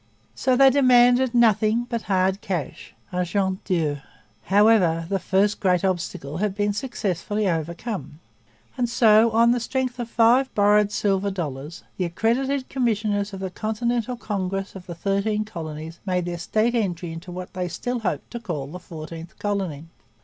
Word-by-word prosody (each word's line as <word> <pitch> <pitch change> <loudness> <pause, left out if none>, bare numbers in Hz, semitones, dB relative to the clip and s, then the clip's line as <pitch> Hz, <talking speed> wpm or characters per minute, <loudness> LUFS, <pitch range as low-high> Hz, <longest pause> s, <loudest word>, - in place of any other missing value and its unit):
So 255 -1 +1
they 270 +1 +7
demanded 250 -2 +5
nothing 225 0 +3
but 235 -2 -2
hard 190 0 +2
cash 175 -6 -5 0.2
argent 185 +1 -1
dur. 155 -6 0 0.4
However, 190 -4 +4
the 195 +1 -1
first 200 +3 +1
great 180 -1 +2
obstacle 170 -5 -3
had 200 0 -1
been 205 0 0
successfully 210 -3 -2
overcome; 170 +1 -3 0.6
and 240 -1 +1
so, 230 -2 +5
on 230 +1 +4
the 245 - +2
strength 255 +1 -2
of 240 -1 -4
five 240 +3 +4
borrowed 205 0 +4
silver 200 -1 0
dollars, 155 -4 -5
the 185 - 0
accredited 255 +9 0
commissioners 210 -5 0
of 195 -1 -7
the 190 -1 -4
Continental 235 +4 -2
Congress 195 -3 -3
of 190 -2 -11
the 170 - -6
Thirteen 200 +4 0
Colonies 160 -4 -7
made 180 -2 -1
their 175 -1 -4
state 215 +7 +1
entry 180 -7 -1
into 165 +3 -8
what 180 0 -7
they 180 -1 -2
still 245 +8 -3
hoped 180 -10 -3
to 235 - -5
call 170 -11 -4
the 165 +6 -8
Fourteenth 165 0 -9
Colony. 190 -8 -3
200 Hz, 155 wpm, -24 LUFS, 175-230 Hz, 0.6 s, they